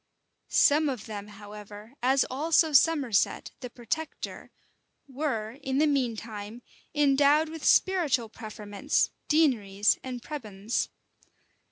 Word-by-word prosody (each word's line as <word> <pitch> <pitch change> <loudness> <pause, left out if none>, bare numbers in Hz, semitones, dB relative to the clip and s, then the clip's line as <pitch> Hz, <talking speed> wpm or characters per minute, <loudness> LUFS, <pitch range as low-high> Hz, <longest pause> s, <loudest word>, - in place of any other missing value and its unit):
Some 300 +1 +4
of 250 -6 -5
them, 205 -2 -7
however, 210 +2 -11
as 260 +2 +3
also 315 +3 +2
Somerset, 275 -7 +2
the 250 - -7
protector, 245 +7 -5 0.6
were, 260 -4 -3
in 265 0 -2
the 305 - +4
mean 265 -6 +1
time, 215 +1 -8 0.3
endowed 290 +2 +4
with 320 -1 -8
spiritual 310 -11 +3
preferments, 215 +3 -2 0.2
deaneries, 215 -10 +2
and 250 -2 -6
prebends. 220 -7 -3
250 Hz, 110 wpm, -28 LUFS, 215-295 Hz, 0.6 s, Some